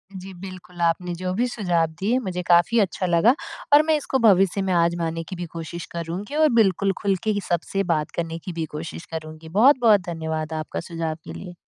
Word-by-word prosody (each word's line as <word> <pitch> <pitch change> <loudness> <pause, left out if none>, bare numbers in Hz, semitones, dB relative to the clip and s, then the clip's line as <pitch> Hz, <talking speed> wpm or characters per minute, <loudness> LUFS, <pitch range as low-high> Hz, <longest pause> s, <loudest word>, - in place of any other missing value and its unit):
जी, 190 +1 -8
बिल्कुल, 180 -1 -10
आपने 170 +1 +1
जो 185 +1 -3
भी 240 +6 +1
सुझाव 180 -9 0
दिए 220 +6 +1
मुझे 185 -7 -4
काफ़ी 175 +7 +4
अच्छा 190 -2 0
लगा, 175 +7 +4 0.4
और 295 - +8
मैं 315 0 +2
इसको 270 -2 -1
भविष्य 195 -4 +4
में 190 -1 0
आज़माने 170 -1 0
की 185 - -5
भी 175 - -5
कोशिश 165 +1 -6
करूँगी 175 - -5
और 310 -1 +4
बिल्कुल 195 0 +2
खुल 200 -2 +2
के 215 - +1 0.2
सबसे 175 +3 0
बात 155 -1 -2
करने 165 -1 -3
की 185 - -5
भी 165 -1 -2
कोशिश 160 +2 -6
करूँगी 160 0 -7
बहुत-बहुत 235 -5 +6
धन्यवाद 160 -1 -3
आपका 155 0 -4
सुझाव 165 -2 -4
के - - -8
लिए। 180 -2 -8
180 Hz, 195 wpm, -23 LUFS, 165-200 Hz, 0.4 s, और